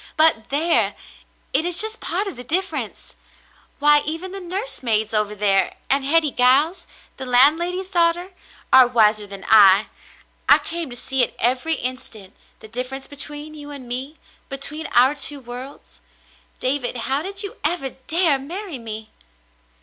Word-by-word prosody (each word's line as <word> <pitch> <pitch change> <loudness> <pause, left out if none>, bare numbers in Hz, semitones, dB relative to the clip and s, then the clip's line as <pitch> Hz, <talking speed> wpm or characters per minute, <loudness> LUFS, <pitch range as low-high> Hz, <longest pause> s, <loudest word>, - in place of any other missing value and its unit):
But 310 -8 +4
there! 320 +4 +1 0.6
It - - +2
is 350 0 -1
just 440 +1 +2
part 380 +4 -2
of 395 - -6
the 245 - -9
dif 370 +9 -1
ference. - - -7 0.6
Why, 295 0 +6
even 330 +4 -5
the 390 - -7
nursemaids 305 - -2
over 210 -1 +1
there, 195 -2 +1 0.2
and 275 0 +2
Hetty 305 +1 +2
Giles, 275 +9 +2 0.3
the 265 - -4
landlady's 340 +9 +2
daughter, 345 +1 +1 0.4
are 260 -1 +8
wiser 215 -3 +2
than 195 -1 -9
I. 205 -1 +6 0.6
I - - +8
came 335 -3 -6
to 245 - -8
see 265 +1 -1
it 245 - 0
every 255 +7 0
instant, 230 -7 -7 0.3
the - - -11
difference 255 +4 -6
between 295 +1 -4
you 295 -1 -11
and 280 -4 -9
me 260 +6 -5 0.2
— - - -33
between 300 +3 -3
our 255 +3 +4
two 290 -1 +3
worlds. 250 +2 -11 0.6
David, 255 -1 -1
how 270 +2 +2
did 390 +4 0
you 400 - -7
ever 300 -4 0
dare 315 +2 +1
marry 340 +2 -6
me 220 -1 -7
275 Hz, 155 wpm, -21 LUFS, 245-330 Hz, 0.6 s, are